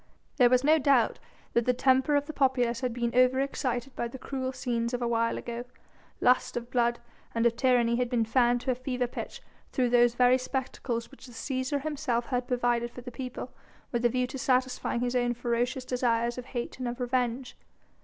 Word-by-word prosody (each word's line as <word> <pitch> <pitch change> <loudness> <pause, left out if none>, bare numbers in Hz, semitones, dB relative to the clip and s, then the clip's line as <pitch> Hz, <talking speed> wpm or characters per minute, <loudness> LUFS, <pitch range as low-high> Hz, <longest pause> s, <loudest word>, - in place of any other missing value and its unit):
There 250 -3 +6
was 250 +1 +3
no 310 +2 +5
doubt 265 -5 +3 0.3
that 235 -1 +2
the 250 - +3
temper 265 +3 +3
of 285 0 +2
the 310 - -7
populace 250 -4 +1
had 250 -2 -1
been 235 0 -2
over 255 +1 +4
excited 255 -2 -2
by 235 - -2
the 235 - -9
cruel 260 0 -4
scenes 245 -2 -2
of 245 - -4
a - - +1
while 230 0 +1
ago; 235 0 -5 0.6
lust 250 -1 +3
of 240 0 -6
blood 240 -1 +2 0.4
and 230 0 +1
of 235 -1 +3
tyranny 240 -2 +3
had 250 -1 0
been 235 -3 +1
fanned 240 +1 +2
to 255 - 0
fever 255 0 -2
pitch 240 - -7 0.3
through 250 -2 +1
those 240 -1 +4
very 250 +1 +5
spectacles 255 -2 -3
which 275 - -14
the 245 - -13
Cæsar 260 +3 -2
himself 285 -6 -1
had 250 -1 -2
provided 240 -1 +1
for 250 - -10
the 245 0 -8
people, 255 0 -6 0.4
with 240 -1 -1
a 240 - +5
view 250 +1 0
to 265 +2 -7
satisfying 255 -2 0
his 245 0 -1
own 245 -1 +1
ferocious 245 +2 -1
desires 240 -1 0
of 245 - -8
hate 245 0 -5
and 255 - -2
of 240 +1 -4
revenge. 245 0 -1
245 Hz, 205 wpm, -28 LUFS, 240-260 Hz, 0.6 s, There